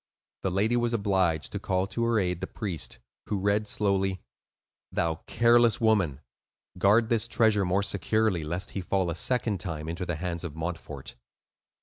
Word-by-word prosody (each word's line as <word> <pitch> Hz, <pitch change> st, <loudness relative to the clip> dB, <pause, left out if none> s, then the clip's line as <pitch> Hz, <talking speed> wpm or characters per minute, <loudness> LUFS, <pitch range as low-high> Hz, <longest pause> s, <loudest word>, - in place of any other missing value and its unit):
The 95 Hz, -, 0 dB
lady 105 Hz, +6 st, +1 dB
was 120 Hz, 0 st, +1 dB
obliged 95 Hz, -7 st, +1 dB
to 100 Hz, -, -3 dB
call 95 Hz, -1 st, 0 dB
to 115 Hz, +4 st, -3 dB
her 115 Hz, -2 st, +2 dB
aid 90 Hz, -2 st, -1 dB
the 95 Hz, -, -3 dB
priest, 95 Hz, -, -4 dB, 0.3 s
who 105 Hz, -, -1 dB
read 100 Hz, +2 st, +1 dB
slowly:— 95 Hz, -2 st, +1 dB, 0.7 s
"Thou 80 Hz, -1 st, -1 dB
careless 120 Hz, 0 st, +4 dB
woman, 100 Hz, -, +2 dB, 0.6 s
guard 110 Hz, +5 st, +4 dB
this 115 Hz, -1 st, +1 dB
treasure 110 Hz, -4 st, +3 dB
more 95 Hz, +3 st, +1 dB
securely, 100 Hz, -1 st, +1 dB
lest 85 Hz, +5 st, -4 dB
he 100 Hz, -, -3 dB
fall 90 Hz, -1 st, 0 dB
a -, -, -3 dB
second 110 Hz, 0 st, 0 dB
time 80 Hz, -3 st, -5 dB
into 85 Hz, +2 st, -4 dB
the 90 Hz, -, -1 dB
hands 85 Hz, +1 st, -4 dB
of 80 Hz, -4 st, -5 dB
Montfort." 80 Hz, -4 st, -5 dB
95 Hz, 165 wpm, -28 LUFS, 85-110 Hz, 0.7 s, careless